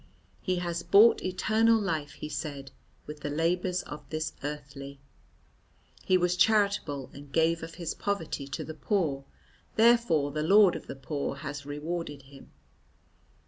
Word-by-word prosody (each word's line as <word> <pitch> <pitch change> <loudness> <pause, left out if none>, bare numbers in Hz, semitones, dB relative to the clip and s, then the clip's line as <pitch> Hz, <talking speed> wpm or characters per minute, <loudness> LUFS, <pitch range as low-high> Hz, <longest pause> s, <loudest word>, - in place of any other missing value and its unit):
"He 185 - 0
has 175 -1 -2
bought 200 +7 +6
eternal 220 +5 +3
life," 155 -8 -2
he - - -7
said, 145 -2 -5 0.3
"with 150 0 -8
the 145 - -4
labours 175 +4 0
of 150 - -8
the 155 0 -2
earthly. 140 -1 -7 1.0
He 185 - +4
was 180 0 +1
charitable 200 -10 +2
and 140 0 -12
gave 165 +2 +2
of 165 0 -8
his 170 -3 -4
poverty 165 -8 -3
to 135 - -4
the 160 - -7
poor, 155 -7 -1 0.5
therefore 220 -11 +4
the 150 +1 -2
Lord 190 +2 +6
of 160 - -8
the - - -6
Poor 140 +1 -3
has 145 0 -6
rewarded 150 -1 -4
him." 135 +1 -15
160 Hz, 145 wpm, -29 LUFS, 145-185 Hz, 1.0 s, bought